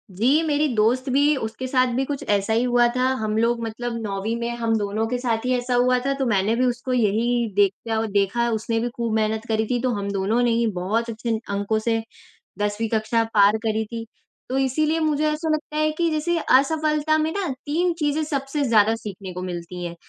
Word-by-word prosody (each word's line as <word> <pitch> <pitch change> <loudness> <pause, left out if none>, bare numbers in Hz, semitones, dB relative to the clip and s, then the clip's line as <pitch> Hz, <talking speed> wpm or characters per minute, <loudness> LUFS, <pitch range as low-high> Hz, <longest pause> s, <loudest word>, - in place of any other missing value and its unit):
जी, 240 - +2
मेरी 300 -1 +1
दोस्त 240 +5 +2
भी 285 +3 +3
उसके 225 0 -4
साथ 255 0 +2
भी 265 +2 0
कुछ 280 0 -4
ऐसा 205 +1 +1
ही 230 +2 +2
हुआ 245 -1 +4
था, 255 - +1 0.2
हम 215 0 -1
लोग 235 +1 +1
मतलब 230 +1 -4
9वीं 210 +1 -2
में 235 0 -2
हम 230 -1 0
दोनों 210 +1 -1
के 250 +2 -1
साथ 235 -2 -1
ही 255 - +1
ऐसा 245 +1 -2
हुआ 250 +1 +3
था, 275 - +1
तो 275 -1 -2
मैंने 210 -1 +1
भी 255 +2 +2
उसको 250 +1 -1
यही 235 +1 +1
देखा 205 +3 +1
औ - - -1
देखा 200 +4 +1
उसने 225 +1 -1
भी 240 +2 -1
खूब 235 -2 -2
मेहनत 220 +1 0
करी 220 0 0
थी, 245 +1 0
तो 255 - 0
हम 200 -1 -3
दोनों 200 +4 0
ने 240 - +2
ही 230 0 +2
बहुत 205 +6 -1
अच्छे 225 0 -2
अंकों 200 +2 0
से 225 0 0 0.6
10वीं 205 +2 -1
कक्षा 220 +1 +1
पार 205 0 +5
करी 220 0 0
थी। 230 +1 -6 0.4
तो 260 - -1
इसीलिए 305 +5 +1
मुझे 305 -1 +1
ऐसा 310 +2 -3
लगता 305 0 -5
है 310 0 +2
कि 340 -1 +2
जैसे 320 +2 0
असफलता 305 +2 +2
में 310 +1 0
ना 395 -2 -2 0.2
3 345 +5 +1
चीज़ें 300 0 0
सबसे 285 0 -2
ज़्यादा 220 -3 +4
सीखने 200 -4 -7
को 180 +1 -6
मिलती 175 0 -6
हैं। 170 -1 -5
235 Hz, 215 wpm, -23 LUFS, 215-270 Hz, 0.6 s, पार